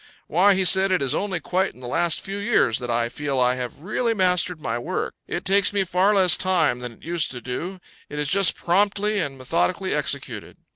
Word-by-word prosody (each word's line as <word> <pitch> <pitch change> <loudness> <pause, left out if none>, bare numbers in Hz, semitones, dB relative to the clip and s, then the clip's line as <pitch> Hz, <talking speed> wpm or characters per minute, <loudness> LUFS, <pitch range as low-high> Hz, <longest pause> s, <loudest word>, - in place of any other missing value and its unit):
"Why," 190 +5 +3
he 190 0 +1
said, 190 +1 +5
"it 185 -6 +1
is 135 - +1
only 195 -4 -2
quite 185 +3 -2
in - - -17
the 125 - -8
last 165 +5 0
few 195 +1 -6
years 200 - +1
that 125 -1 -6
I 120 0 +1
feel 135 +2 -3
I 125 0 +3
have 125 +2 -6
really 225 +6 -1
mastered 180 -3 +1
my 120 -5 -3
work. 180 +10 -4
It 175 - -5
takes 200 +1 +4
me 200 -1 0
far 190 +3 +1
less 185 -3 +6
time 165 -9 +1
than 125 -1 -7
it - - -22
used 170 -1 -1
to 125 - -7
do; 170 +10 -6 0.3
it 150 - -8
is 150 -1 -2
just 195 +4 +4
promptly 205 +3 0
and 140 -6 -3
methodically 125 -8 -1
executed." - - -3
175 Hz, 220 wpm, -23 LUFS, 130-195 Hz, 0.3 s, less